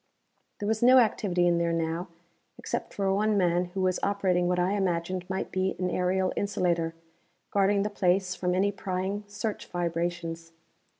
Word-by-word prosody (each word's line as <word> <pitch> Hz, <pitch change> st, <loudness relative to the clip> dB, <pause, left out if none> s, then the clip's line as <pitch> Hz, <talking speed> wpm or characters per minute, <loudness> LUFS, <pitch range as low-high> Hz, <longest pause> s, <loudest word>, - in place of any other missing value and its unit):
There 205 Hz, -, -4 dB
was 220 Hz, 0 st, 0 dB
no 255 Hz, +2 st, +7 dB
activity 200 Hz, -7 st, +2 dB
in 170 Hz, -1 st, +3 dB
there 170 Hz, 0 st, +1 dB
now, 165 Hz, +2 st, -1 dB, 0.5 s
except -, -, -4 dB
for 195 Hz, -1 st, 0 dB
one 210 Hz, +1 st, +2 dB
man 175 Hz, -1 st, +2 dB
who 185 Hz, +2 st, -5 dB
was 185 Hz, -1 st, +1 dB
operating 185 Hz, -3 st, +1 dB
what 180 Hz, 0 st, +1 dB
I 180 Hz, +1 st, +1 dB
imagined 185 Hz, -2 st, -1 dB
might 190 Hz, -, -3 dB
be 190 Hz, 0 st, 0 dB
an 180 Hz, -1 st, -1 dB
aerial 185 Hz, +1 st, +1 dB
insulator, 170 Hz, -5 st, 0 dB, 0.6 s
guarding 200 Hz, 0 st, +3 dB
the 210 Hz, -, -1 dB
place 185 Hz, -1 st, +1 dB
from 180 Hz, -1 st, -1 dB
any 200 Hz, +2 st, +2 dB
prying 190 Hz, +1 st, -3 dB
search 205 Hz, +1 st, -4 dB
vibrations. 170 Hz, -1 st, -3 dB
185 Hz, 165 wpm, -28 LUFS, 175-200 Hz, 0.6 s, no